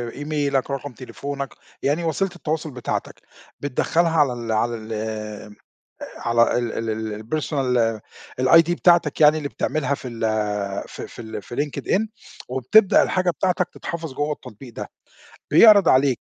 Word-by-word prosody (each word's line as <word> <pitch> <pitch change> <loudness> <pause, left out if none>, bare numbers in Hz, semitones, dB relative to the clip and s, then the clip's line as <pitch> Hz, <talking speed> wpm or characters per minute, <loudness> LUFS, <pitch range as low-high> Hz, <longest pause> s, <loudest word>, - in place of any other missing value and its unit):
إيميلك، 145 -2 -1
رقم 140 -1 -4
تليفونك، 140 +3 -6 0.3
يعني 150 +5 +1
وسيلة 175 +4 0
التواصل 155 -2 -3
بتاعتك، 125 -2 -4 0.4
بتدخّلها 160 +4 +1
على 135 -4 +3
ال 115 -2 -5
على 115 +2 +1
ال 110 0 -9 1.3
على 115 0 +2
ال 120 -2 -2
ال 115 0 -3
ال 110 -1 -4 0.2
الpersonal 125 -6 0 0.4
الID 165 +6 +6
بتاعتك 170 -4 +3
يعني 150 +1 +6
اللي 145 -2 -4
بتعملها 140 -2 -1
في 130 - -7
ال 115 -1 -9 0.7
في - - -8
في 120 - -10
ال 110 -2 -7
في 120 - -9
Linked 145 -1 -3
in 215 +3 +2 0.4
وبتبدأ 130 - +4
الحاجة 185 -1 +1
بتاعتك 180 +2 0
تتحفظ 160 -5 -6
جوّا 145 +2 -1
التطبيق 120 -2 -10
ده، - - -6 0.6
بيعرض 210 -5 +7
عليك 130 -2 +4
140 Hz, 145 wpm, -22 LUFS, 120-160 Hz, 1.3 s, بيعرض